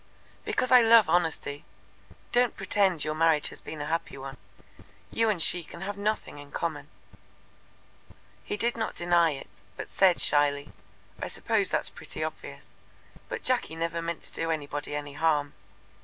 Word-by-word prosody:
"Because 255 Hz, -, 0 dB
I 250 Hz, -1 st, +9 dB
love 225 Hz, -2 st, +7 dB
honesty. 160 Hz, -4 st, 0 dB, 0.7 s
Don't 245 Hz, -1 st, +2 dB
pretend 195 Hz, -4 st, +1 dB
your 155 Hz, -, -1 dB
marriage 160 Hz, -1 st, +3 dB
has -, -, -9 dB
been 155 Hz, -2 st, -7 dB
a -, -, -3 dB
happy 165 Hz, -1 st, -2 dB
one. 135 Hz, 0 st, -8 dB, 0.7 s
You 225 Hz, -1 st, +2 dB
and 205 Hz, -5 st, 0 dB
she 175 Hz, +2 st, +3 dB
can 170 Hz, +2 st, -11 dB
have 200 Hz, +1 st, -4 dB
nothing 205 Hz, -7 st, -2 dB
in 145 Hz, 0 st, -11 dB
common." 150 Hz, -4 st, -3 dB, 1.6 s
He 205 Hz, -, -3 dB
did 235 Hz, +3 st, 0 dB
not 225 Hz, -1 st, -3 dB
deny 175 Hz, -1 st, +3 dB
it, 135 Hz, -, -9 dB, 0.3 s
but -, -, -6 dB
said 185 Hz, -3 st, +4 dB
shyly: 145 Hz, 0 st, +2 dB, 0.5 s
"I -, -, -2 dB
suppose -, -, 0 dB
that's -, -, 0 dB
pretty -, -, -5 dB
obvious; -, -, -7 dB, 0.6 s
but -, -, -5 dB
Jacky 250 Hz, -10 st, +1 dB
never 165 Hz, 0 st, -2 dB
meant 165 Hz, 0 st, -4 dB
to -, -, -4 dB
do 165 Hz, -, -2 dB
anybody 145 Hz, -2 st, -3 dB
any 145 Hz, -1 st, -5 dB
harm. 145 Hz, -1 st, +1 dB
165 Hz, 160 wpm, -28 LUFS, 145-200 Hz, 1.6 s, I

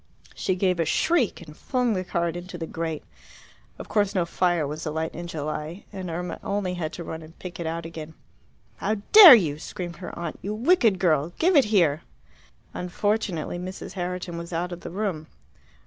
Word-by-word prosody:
She 185 Hz, -, -1 dB
gave 180 Hz, -1 st, +1 dB
a -, -, +3 dB
shriek 245 Hz, -, +1 dB
and 150 Hz, -2 st, -13 dB
flung 250 Hz, -, 0 dB
the 185 Hz, -2 st, -1 dB
card 170 Hz, -2 st, -1 dB
into 175 Hz, 0 st, -7 dB
the 165 Hz, -, -4 dB
grate. 160 Hz, -1 st, -4 dB, 0.7 s
Of -, -, -8 dB
course 205 Hz, -2 st, +1 dB
no 180 Hz, -3 st, +2 dB
fire 175 Hz, -2 st, +1 dB
was 150 Hz, +3 st, -5 dB
alight 160 Hz, +1 st, -3 dB
in 175 Hz, +1 st, -6 dB
July, 155 Hz, +3 st, -5 dB
and 190 Hz, -2 st, -5 dB
Irma 175 Hz, +2 st, -4 dB
only 200 Hz, -2 st, -1 dB
had 165 Hz, -3 st, -3 dB
to 175 Hz, -, -6 dB
run 160 Hz, 0 st, -6 dB
and 160 Hz, +1 st, -14 dB
pick 180 Hz, -1 st, -8 dB
it 170 Hz, -, -3 dB
out 165 Hz, +1 st, -3 dB
again. 160 Hz, -1 st, -8 dB, 0.6 s
"How 215 Hz, -, 0 dB, 0.2 s
dare 400 Hz, -, +12 dB
you!" 155 Hz, -9 st, 0 dB
screamed 175 Hz, +1 st, -6 dB
her 180 Hz, -, -8 dB
aunt. 170 Hz, -2 st, -5 dB
"You 210 Hz, +2 st, -3 dB
wicked 235 Hz, -, +3 dB
girl! 165 Hz, -3 st, +1 dB
Give 360 Hz, +2 st, +3 dB
it 280 Hz, -, +6 dB
here!" 170 Hz, -8 st, +3 dB, 0.7 s
Unfortunately 180 Hz, -2 st, -2 dB
Mrs. 185 Hz, +1 st, -7 dB
Herriton 180 Hz, -2 st, -4 dB
was 170 Hz, +1 st, -8 dB
out 175 Hz, +2 st, -2 dB
of 175 Hz, 0 st, -7 dB
the -, -, -7 dB
room. 180 Hz, -4 st, -3 dB
175 Hz, 190 wpm, -25 LUFS, 160-195 Hz, 0.7 s, dare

